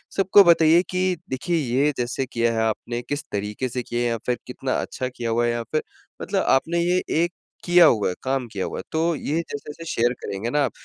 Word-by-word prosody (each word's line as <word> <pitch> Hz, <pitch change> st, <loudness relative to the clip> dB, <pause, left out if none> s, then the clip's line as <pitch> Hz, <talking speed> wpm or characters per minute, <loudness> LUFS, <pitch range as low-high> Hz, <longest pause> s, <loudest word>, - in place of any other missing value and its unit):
सबको 195 Hz, +1 st, +6 dB
बताइए 170 Hz, -1 st, +6 dB
कि 185 Hz, 0 st, 0 dB
देखिए, 150 Hz, +7 st, -1 dB
ये 140 Hz, +1 st, +1 dB
जैसे 125 Hz, +2 st, -2 dB
किया 115 Hz, 0 st, +1 dB
है 110 Hz, -, 0 dB
आपने 120 Hz, +2 st, -3 dB
किस 145 Hz, +1 st, -2 dB
तरीके 105 Hz, +5 st, -3 dB
से 125 Hz, +1 st, -3 dB
किया 120 Hz, +1 st, -3 dB
है 120 Hz, -, +1 dB
या 115 Hz, -, -1 dB
फ़िर 125 Hz, -1 st, 0 dB
कितना 130 Hz, +1 st, -3 dB
अच्छा 130 Hz, -, -4 dB
किया 120 Hz, -1 st, -3 dB
हुआ 120 Hz, +1 st, +1 dB
है 120 Hz, -, +1 dB
यहाँ 120 Hz, 0 st, -3 dB
पे। 155 Hz, -, +1 dB, 0.4 s
मतलब -, -, 0 dB
आपने 165 Hz, +6 st, +2 dB
ये 175 Hz, +1 st, +2 dB, 0.3 s
एक 175 Hz, -, -1 dB, 0.3 s
किया 175 Hz, -1 st, +7 dB
हुआ 110 Hz, -10 st, +3 dB
है 90 Hz, -, -4 dB
काम 130 Hz, -1 st, -1 dB
किया 95 Hz, -2 st, -2 dB
हुआ -, -, -5 dB
है, -, -, -6 dB
तो 165 Hz, +1 st, +1 dB
ये 150 Hz, +2 st, -2 dB
जैसे-जैसे 150 Hz, 0 st, -7 dB
शेयर 120 Hz, +1 st, +2 dB
करेंगे 100 Hz, +4 st, -3 dB
न 125 Hz, -, -5 dB
आप 140 Hz, -4 st, +2 dB
130 Hz, 225 wpm, -23 LUFS, 120-165 Hz, 0.4 s, किया